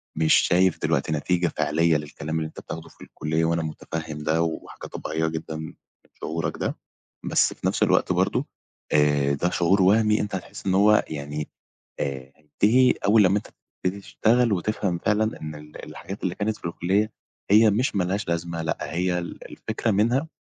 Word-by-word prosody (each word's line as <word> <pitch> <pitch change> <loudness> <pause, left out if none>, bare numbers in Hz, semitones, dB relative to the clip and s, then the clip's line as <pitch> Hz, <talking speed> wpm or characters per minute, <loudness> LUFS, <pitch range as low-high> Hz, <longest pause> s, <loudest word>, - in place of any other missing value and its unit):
مش 80 0 +3
شايف 90 0 +3
دلوقتي 70 +3 0
نتيجة 85 +4 +1
فعلية 80 +1 +2
للكلام 75 +1 -5
اللي 80 - -2
أنت 80 - -11
بتاخده 80 0 -8
في - - -22
الكلية، 80 +2 -1
وأنا 85 0 +1
متفهم 80 0 -5
ده 80 +2 +1
وحاجة 80 -1 -5
طبيعية 80 +1 -2
جدًا 80 0 -4
من 80 0 -6 0.5
شعورك 80 0 -3
ده، - - -2 0.5
بس - - +2
في - - -3
نفس - - +1
الوقت - - +3
برضه - - +1 0.5
آآ 75 -2 +3
ده 85 +5 0
شعور 90 +3 +2
وهمي 105 +3 +4
أنت 105 -1 -3
هتحس 95 - -8
إن 95 - +1
هو 105 +2 +5
يعني 75 0 -5 0.5
آآ 65 -2 -4
هينتهي 110 - +3 0.2
أول 110 +1 +6
لمّا 95 +2 +4
أنت 105 - -11 0.3
تبتدي 95 +2 -1
تشتغل 115 +3 +2
وتفهم 95 -1 -1
فعلًا 110 +4 0
إن 75 0 -6
ال 75 0 -10
الحاجات 95 +4 -8
اللي 90 -1 -1
كانت 105 +2 -1
في - - -24
الكلية 95 +6 0 0.4
هي 110 +2 +7
مش 110 +2 0
ما 95 - +2
لهاش 95 +2 -2
لازمة، 85 0 -2
لأ 80 - -2 0.2
هي 90 +1 +1
ال 85 - -7
الفكرة 115 - -2
منها 120 +9 +2
85 Hz, 175 wpm, -25 LUFS, 80-105 Hz, 0.5 s, هي